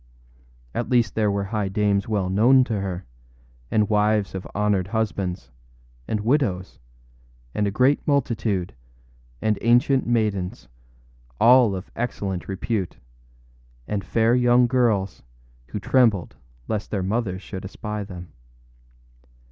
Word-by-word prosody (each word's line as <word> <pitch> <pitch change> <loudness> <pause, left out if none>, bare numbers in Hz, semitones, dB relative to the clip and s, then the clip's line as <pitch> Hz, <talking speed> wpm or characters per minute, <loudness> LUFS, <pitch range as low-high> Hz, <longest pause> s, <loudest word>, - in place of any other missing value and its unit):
At 120 - -3
least 120 -3 +2
there 110 -2 +1
were 100 0 -1
high 100 0 -2
dames 100 0 +1
well 105 -4 0
known 120 +8 +5
to 110 -4 -2
her, 95 -1 -4 0.6
and 105 -1 +2
wives 105 -1 +1
of 95 -1 -6
honored 100 -3 +1
husbands, 100 - -2 0.6
and 105 - -1
widows, 105 - 0 0.7
a 105 -1 0
great 130 +7 +3
multitude, 115 - 0 0.7
and 110 -2 +1
ancient 125 +3 +3
maidens, 105 -6 -1 0.7
all 120 -4 +6
of 95 +1 -8
excellent 100 -6 -3
repute, 95 - -3 0.9
and 100 -2 -2
fair 115 +5 +2
young 125 0 +4
girls, 115 -7 +1 0.5
who 105 - -5
trembled 105 -4 +2 0.3
lest 110 -1 -3
their 100 -3 -2
mothers 95 -2 -2
should 95 - -7
espy 105 +2 -5
them. 90 -3 -10
105 Hz, 120 wpm, -23 LUFS, 95-120 Hz, 0.9 s, all